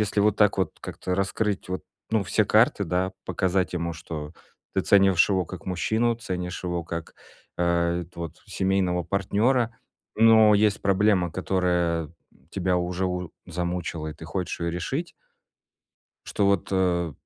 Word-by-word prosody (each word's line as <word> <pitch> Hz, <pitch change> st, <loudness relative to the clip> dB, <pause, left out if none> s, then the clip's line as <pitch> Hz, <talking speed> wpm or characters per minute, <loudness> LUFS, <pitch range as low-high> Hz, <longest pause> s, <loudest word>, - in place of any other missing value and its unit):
если 105 Hz, 0 st, -1 dB
вот 105 Hz, 0 st, +3 dB
так 105 Hz, -2 st, +3 dB
вот 95 Hz, -4 st, 0 dB
как-то 90 Hz, -, -4 dB
раскрыть 100 Hz, +1 st, -1 dB
вот 95 Hz, 0 st, -3 dB, 0.3 s
ну 110 Hz, -3 st, +1 dB
все -, -, +2 dB
карты, -, -, +3 dB
да, 90 Hz, +1 st, -1 dB
показать 95 Hz, -2 st, 0 dB
ему, 85 Hz, -1 st, -2 dB
что 80 Hz, -2 st, -7 dB, 0.4 s
ты -, -, +2 dB
ценишь 95 Hz, -3 st, +5 dB
его 95 Hz, -3 st, +1 dB
как 85 Hz, 0 st, -9 dB
мужчину, 110 Hz, +6 st, +1 dB
ценишь 90 Hz, -5 st, -5 dB
его 90 Hz, -1 st, -2 dB
как, 85 Hz, 0 st, -6 dB, 0.4 s
э, 85 Hz, 0 st, +1 dB
вот 85 Hz, -2 st, -5 dB
семейного 95 Hz, -2 st, 0 dB
партнёра, 110 Hz, +5 st, +1 dB, 0.4 s
но 110 Hz, -1 st, +7 dB
есть 105 Hz, -1 st, +2 dB
проблема, 100 Hz, -2 st, +3 dB
которая 90 Hz, -4 st, 0 dB, 0.4 s
тебя 90 Hz, -1 st, 0 dB
уже 90 Hz, +1 st, -1 dB
у 90 Hz, -1 st, -3 dB, 0.2 s
замучила, 85 Hz, -2 st, -3 dB
и 75 Hz, -, -7 dB
ты 80 Hz, -, -11 dB
хочешь 90 Hz, +1 st, -3 dB
её 85 Hz, 0 st, -1 dB
решить 135 Hz, -, -3 dB, 1.2 s
что 100 Hz, -, 0 dB
вот, 100 Hz, -3 st, +1 dB
э, 90 Hz, -3 st, +1 dB
90 Hz, 145 wpm, -25 LUFS, 85-100 Hz, 1.2 s, но